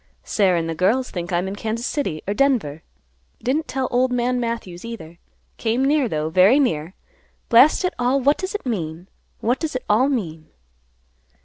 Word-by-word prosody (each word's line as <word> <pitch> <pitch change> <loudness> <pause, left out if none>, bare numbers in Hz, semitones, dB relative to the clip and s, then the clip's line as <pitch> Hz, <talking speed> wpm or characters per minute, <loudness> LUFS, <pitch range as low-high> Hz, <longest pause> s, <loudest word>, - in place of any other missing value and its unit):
Sarah 190 -4 +2
and 165 -1 -1
the 165 - -2
girls 215 +10 +1
think 175 0 -5
I 175 - +1
am 180 +2 -1
in 195 - -4
Kansas 225 +3 -3
City 190 - -2
or 200 - 0
Denver. 205 - +1 0.6
Didn't 300 +6 0
tell 265 -1 -2
old 250 +1 +2
man 245 0 0
Matthews, 230 -7 -4
either; 175 -8 -9 0.4
came 235 +4 0
near, 285 -3 +2
though, 155 -1 -2
very 190 - +5
near. 165 - -1 0.5
Blast 275 +10 +6
it 365 - 0
all; 250 +3 +2
what 280 +3 +2
does 375 +2 -4
it 420 - -4
mean? 175 -6 -4 0.3
what 245 +4 +1
does 315 -5 -3
it 255 - -3
all 235 +7 +3
mean?" 165 - -3
230 Hz, 185 wpm, -22 LUFS, 175-260 Hz, 0.6 s, Blast